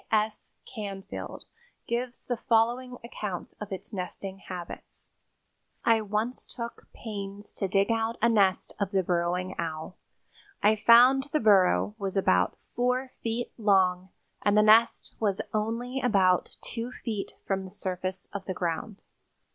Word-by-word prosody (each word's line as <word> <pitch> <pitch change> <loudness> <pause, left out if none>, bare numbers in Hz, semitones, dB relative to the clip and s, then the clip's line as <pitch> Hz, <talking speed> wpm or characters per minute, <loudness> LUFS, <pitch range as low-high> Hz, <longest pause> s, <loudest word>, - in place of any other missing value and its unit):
C. - - -34
S. 215 0 0 0.2
Canfield 200 -4 -6 0.4
gives 240 +1 -3
the 245 - -1
following 240 +2 +1
account 210 -6 -5
of 210 - -6
its 195 +3 -6
nesting 190 +1 -5
habits: 180 -3 -8 0.7
"I 225 -1 +5
once 215 +4 -2
took 235 -1 -6
pains 205 -2 -7
to 195 - -1
dig 195 +3 +2
out 225 0 0
a 235 - +4
nest 200 -5 +2
of 200 -2 0
the 190 -1 +1
Burrowing 180 +1 0
Owl. 160 +2 -4 0.7
I 210 +1 +6
found 245 +5 +7
the 305 - +2
burrow 205 -1 +4
was 195 -1 -2
about 90 - +3 0.2
four 250 +2 +1
feet 230 +1 -2
long 190 -3 +3 0.3
and 205 0 +3
the 210 - +7
nest 220 +2 +5
was 200 -3 +1
only 230 +5 -1
about 190 -7 +3
two 235 +1 -5
feet 220 -5 -4
from 195 -1 -1
the 190 - -8
surface 185 -1 -4
of 200 -1 -5
the 185 - -3
ground. 180 +4 -3
205 Hz, 145 wpm, -28 LUFS, 190-230 Hz, 0.7 s, found